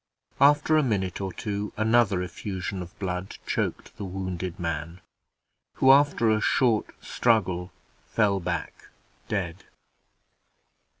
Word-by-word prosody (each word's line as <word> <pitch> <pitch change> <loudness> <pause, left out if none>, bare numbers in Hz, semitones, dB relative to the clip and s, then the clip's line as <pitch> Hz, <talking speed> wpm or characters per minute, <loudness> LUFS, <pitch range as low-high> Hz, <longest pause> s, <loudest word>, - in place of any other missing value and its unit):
After 150 +2 +5
a - - +5
minute 100 -8 -1
or 95 -1 -3
two, 100 +2 -4
another 110 -4 +3
effusion 95 +1 -5
of 90 -1 -10
blood 90 -1 -4
choked - - -2
the - - -6
wounded 95 -1 -4
man, 85 +1 -4 0.8
who, 130 - +6
after 140 -5 +4
a 110 0 +2
short 115 -4 +2 0.2
struggle, 95 -6 +1 0.4
fell 100 -3 +2
back 85 - -4 0.4
dead. 95 -4 -3
100 Hz, 115 wpm, -26 LUFS, 90-110 Hz, 0.8 s, who